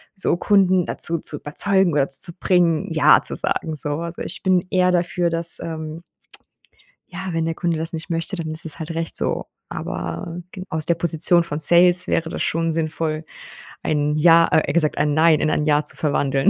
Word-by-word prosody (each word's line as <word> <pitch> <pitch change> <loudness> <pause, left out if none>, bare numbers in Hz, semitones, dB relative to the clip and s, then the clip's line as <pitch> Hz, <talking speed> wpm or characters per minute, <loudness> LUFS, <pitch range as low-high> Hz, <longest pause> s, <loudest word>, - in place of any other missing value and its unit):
so 190 -3 -1
Kunden 185 -2 +2
dazu 170 0 -1
zu 150 - -1
überzeugen 190 +5 +1
oder 140 -2 +1
zu 135 +6 +3
bringen, 175 -4 +1
Ja - - +5
zu - - -2
sagen, 160 -1 -2
so, 150 0 -3
also 170 0 -7
ich - - -8
bin 185 -2 +1
eher 180 -1 +2
dafür, 175 0 0
dass, 165 0 +2
ähm 160 0 -7 1.1
ja, 190 +1 -6
wenn 165 -1 -2
der 165 - -2
Kunde 170 -1 -2
das 160 +1 -5
nicht 160 +2 -7
möchte, 165 +4 -3
dann 165 -3 -5
ist 155 +1 -6
es 160 +1 -7
halt 160 +1 -6
recht 165 0 -5
so, - - -2 0.2
aber 175 -2 -6
g 185 - -8
aus 155 -1 -3
der 170 - +1
Position 170 +1 +4
von 150 -3 -5
Sales 175 +3 +6
wäre 165 0 -1
das - - -5
schon 165 0 -1
sinnvoll, 155 0 -3 0.6
ein 150 -1 -1
Ja 165 +2 +5
eher 155 - 0
gesagt 155 -3 0
ein 145 0 0
Nein 160 -1 +4
in 155 - 0
ein 150 - -1
Ja 150 0 +2
zu 150 - -2
verwandeln. 140 -2 +1
165 Hz, 195 wpm, -20 LUFS, 155-175 Hz, 1.1 s, Sales